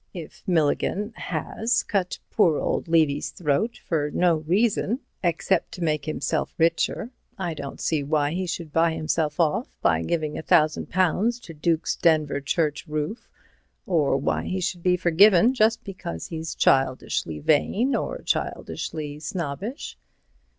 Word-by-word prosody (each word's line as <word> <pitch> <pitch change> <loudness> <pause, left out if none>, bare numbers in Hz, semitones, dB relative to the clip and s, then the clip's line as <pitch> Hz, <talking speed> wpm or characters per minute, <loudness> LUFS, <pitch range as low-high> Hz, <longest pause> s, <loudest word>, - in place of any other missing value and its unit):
"If 165 -4 -9
Milligan 185 +6 +1
has 235 +2 -1
cut 190 -4 -1
poor 170 -8 +3
old - - -1
Levy's 155 -3 +2
throat 170 +8 -1
for 150 -3 0
no 175 +1 +2
reason 205 - +1 0.2
except 175 +3 0
to 180 -5 -5
make 155 -3 0
himself 155 - -2
richer, 170 +8 +1 0.3
I 175 -4 -2
don't 140 -2 -7
see 155 -3 0
why 145 0 +1
he 185 +2 -2
should 165 -3 -5
buy 165 0 +3
himself 155 0 -1
off 170 - +2 0.2
by 80 -1 +3
giving 155 - -1
£1,000 180 +8 +2
to 165 - -9
Duke's 160 +1 0
Denver 155 -4 +2
church 150 +2 -1
roof, 155 +8 -4 0.6
or 150 -7 +2
why 135 - -1
he 190 - -2
should 180 -1 -2
be 180 +1 +3
forgiven 185 +6 +5
just 225 -2 +2
because 180 - -6
he's 160 -1 -5
childishly 130 - +1
vain, 200 - +2
or - - -3
childishly 150 -2 -3
snobbish." 175 - -5
165 Hz, 135 wpm, -25 LUFS, 150-185 Hz, 0.6 s, forgiven